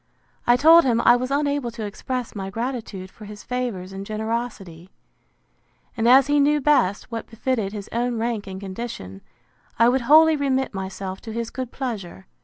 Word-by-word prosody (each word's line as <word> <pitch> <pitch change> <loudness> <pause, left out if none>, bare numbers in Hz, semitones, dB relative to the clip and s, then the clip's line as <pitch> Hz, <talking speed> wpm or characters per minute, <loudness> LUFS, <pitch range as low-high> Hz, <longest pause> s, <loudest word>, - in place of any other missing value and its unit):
I 240 - +6
told 325 +6 +7
him, 235 -3 +2
I 240 - +6
was 255 +1 -2
unable 285 -2 0
to 230 -2 -6
express 245 +4 -4
my 195 -2 -5
gratitude 225 -4 -5
for 215 - -13
his 210 0 -10
favours 235 -7 -4
and 195 0 -6
generosity: 215 -5 -5 1.1
And 230 -1 0
as 265 +1 +7
he 290 +1 +2
knew 295 +1 +3
best 255 -9 +1
what 230 -1 -5
befitted 225 -3 -2
his 205 -2 -7
own 240 0 -1
rank 225 -2 -2
and 190 0 -6
condition, 185 - -7 0.6
I 230 +1 +5
would 260 +1 +1
wholly 315 +5 +6
remit 265 -3 0
myself 190 0 -6
to 225 - -8
his 230 0 -4
good 255 -1 -5
pleasure. 205 - -6
235 Hz, 175 wpm, -23 LUFS, 200-260 Hz, 1.1 s, told